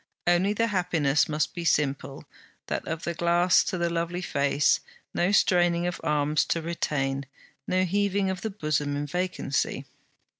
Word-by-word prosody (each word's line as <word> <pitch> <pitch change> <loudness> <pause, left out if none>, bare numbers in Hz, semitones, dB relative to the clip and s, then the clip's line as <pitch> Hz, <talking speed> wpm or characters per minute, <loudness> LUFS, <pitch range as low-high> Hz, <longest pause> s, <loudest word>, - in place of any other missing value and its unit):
Only 175 +4 +3
the 230 +2 +1
happiness 165 -9 +1
must 150 -1 -1
be 175 -3 -5
simple, 140 -3 0 0.4
that - - -4
of 165 +1 -4
the 170 - -2
glass 175 +2 +3
to 185 - -2
the 170 0 0
lovely 170 +2 -2
face: 140 -1 +2 0.3
no 175 +3 +1
straining 175 -3 +3
of 180 0 -3
arms 150 0 +1
to 165 - -1
retain, 140 -5 -2 0.4
no 185 0 +2
heaving 200 +1 +1
of 185 -1 -5
the 220 - -2
bosom 150 -7 -1
in 145 +1 -2
vacancy. 180 -3 -2
170 Hz, 155 wpm, -26 LUFS, 150-180 Hz, 0.4 s, Only